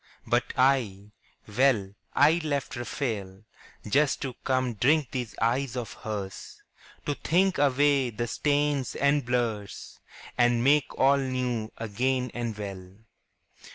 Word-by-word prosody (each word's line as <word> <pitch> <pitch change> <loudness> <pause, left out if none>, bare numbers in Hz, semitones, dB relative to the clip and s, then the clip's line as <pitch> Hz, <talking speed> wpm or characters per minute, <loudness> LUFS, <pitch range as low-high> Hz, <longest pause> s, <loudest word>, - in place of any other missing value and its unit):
But - - +1
I, 115 -7 +1 0.4
well, 110 -3 +2 0.2
I 155 +4 +5
left 145 -3 -2
Raphael 110 -6 -4 0.4
Just 140 +6 +2
to 130 -2 -4
come 130 -2 0
drink 140 +5 +2
these 125 -4 -4
eyes 125 +2 0
of 120 -3 -5
hers, 100 -4 -7 0.4
To 145 - 0
think 185 +6 +1
away 140 -1 +3
the 120 +1 -3
stains 145 +2 0
and 140 0 +2
blurs 115 -4 -3 0.4
And 120 -1 +3
make 145 +1 +2
all 135 +1 +4
new 125 -4 -2
again 125 +3 -1
and 115 -3 -4
well. 95 -2 -7
125 Hz, 120 wpm, -27 LUFS, 110-140 Hz, 0.4 s, I